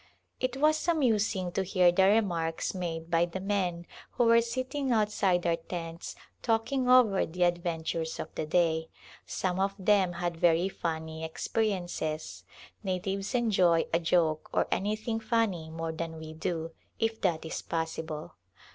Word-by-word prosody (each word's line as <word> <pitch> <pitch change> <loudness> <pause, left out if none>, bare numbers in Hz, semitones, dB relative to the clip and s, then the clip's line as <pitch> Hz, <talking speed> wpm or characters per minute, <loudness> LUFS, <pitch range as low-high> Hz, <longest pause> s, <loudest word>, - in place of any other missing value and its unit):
It 255 0 -1
was 310 +3 +2
amusing 220 - +1
to 195 - 0
hear 185 -2 +4
the 190 +2 +4
remarks 175 -6 +1
made 170 -2 -4
by 170 0 +4
the 175 +2 -6
men 185 -3 -1 0.3
who - - +2
were 230 0 +6
sitting 255 +3 -2
outside 205 -5 +2
our 170 -1 +2
tents 165 0 -6 0.3
talking 245 +3 +1
over 240 -7 +6
the 180 +2 -1
adventures 165 -2 -1
of - - -6
the 155 - -3
day. 160 -1 +1 0.4
Some 185 -1 -1
of 195 +1 +1
them 190 -2 +3
had 175 -1 -3
very 170 +2 +3
funny 160 -3 -4
experiences. 175 -3 -2 0.4
Natives 195 +3 -2
enjoy 190 -8 +3
a 165 - +4
joke 165 -2 +1
or - - +1
anything 215 +3 -1
funny 220 -8 0
more 165 0 -4
than 160 0 -5
we 160 0 -8
do, 165 0 -3 0.3
if 225 0 -1
that 170 -4 0
is 160 - -4
possible. 160 -1 -4
180 Hz, 145 wpm, -29 LUFS, 165-215 Hz, 0.4 s, were